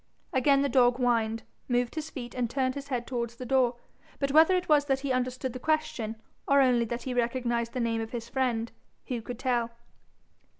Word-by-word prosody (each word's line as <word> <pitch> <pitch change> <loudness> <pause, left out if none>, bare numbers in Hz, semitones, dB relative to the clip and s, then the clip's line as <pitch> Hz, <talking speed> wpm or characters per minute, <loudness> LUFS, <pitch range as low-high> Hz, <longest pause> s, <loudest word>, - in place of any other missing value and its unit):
Again 275 +1 +4
the - - +2
dog 245 -3 +4
whined, 225 -3 +1 0.2
moved 245 -1 0
his 315 -1 -4
feet, 240 -3 -7
and 245 -2 -1
turned 260 0 0
his 280 0 -7
head 250 -4 -2
towards 235 -2 -3
the 250 - -7
door. 255 -1 +2 0.4
But 275 -1 -1
whether 320 +5 +6
it 365 0 -1
was 295 -2 +4
that 270 -2 0
he 275 -1 -2
understood 255 0 -1
the 255 - -6
question, 310 -7 -1 0.3
or 280 0 +5
only 250 -3 +4
that 235 +1 -4
he 260 - -3
recognised 235 -1 0
the 255 - -2
name 230 -1 0
of 225 - -5
his 235 -1 -5
friend, 235 -3 -1 0.4
who 245 -3 -2
could 245 +1 -7
tell? 240 -2 0
250 Hz, 205 wpm, -28 LUFS, 235-270 Hz, 0.4 s, whether